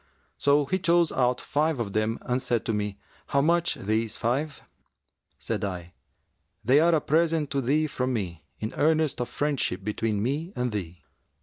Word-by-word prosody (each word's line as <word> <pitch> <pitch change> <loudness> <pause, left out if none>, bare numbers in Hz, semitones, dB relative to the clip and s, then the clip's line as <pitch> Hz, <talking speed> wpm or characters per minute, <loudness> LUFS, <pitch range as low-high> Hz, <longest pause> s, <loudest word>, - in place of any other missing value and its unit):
So 145 0 +4
he 185 +7 0
chose 170 -2 +3
out 125 -1 +1
five 150 -1 0
of 100 -4 -3
them 110 +1 0
and 125 +1 -1
said 120 -3 -1
to 115 - 0
me, 105 -1 -2 0.3
'How 140 - +2
much 170 +3 +2
these 110 +2 -1
five?' 140 +6 -1 0.7
Said - - -3
I, 90 -3 -4 0.7
'They 130 +5 +6
are 170 +1 +4
a 155 - +2
present 160 -1 +1
to 140 -1 +1
thee 145 +5 +2
from 130 -3 -2
me 90 - -3
in 110 - -4
earnest 155 -3 +2
of 120 - -3
friendship 140 -10 -1
between 105 0 -1
me 150 - -2
and 125 -1 -1
thee.' 90 -6 -5
125 Hz, 175 wpm, -27 LUFS, 110-155 Hz, 0.7 s, They